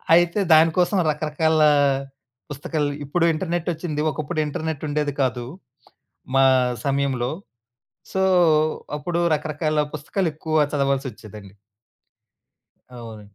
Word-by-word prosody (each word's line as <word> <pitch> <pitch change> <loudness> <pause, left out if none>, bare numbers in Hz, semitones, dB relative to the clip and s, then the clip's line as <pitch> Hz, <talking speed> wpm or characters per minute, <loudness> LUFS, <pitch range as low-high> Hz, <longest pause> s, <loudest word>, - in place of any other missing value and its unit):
అయితే, 175 +3 +3
దాని 160 +1 +6
కోసం 180 +2 +2
రకరకాల 155 +1 0 0.9
పుస్తకాలు 145 +1 -2
ఇప్పుడు 165 +4 +1
ఇంటర్నెటొచ్చింది, 165 -2 -3
ఒకప్పుడు 155 +3 -4
ఇంటర్నెట్టుండేది 150 -1 -3
కాదు 125 -2 -1 0.9
మా 135 - +6 0.4
సమయంలో. 135 -3 0 0.8
సో, 190 - 0 0.8
అప్పుడు 170 +4 -2
రకరకాల 155 0 -2 0.2
పుస్తకాలు 165 +5 -2
ఎక్కువగా 155 0 +1
చదవాల్సొచ్చేదండి. 125 -8 -3 1.4
అవునండి. 110 -3 -11
150 Hz, 85 wpm, -22 LUFS, 135-160 Hz, 1.4 s, దాని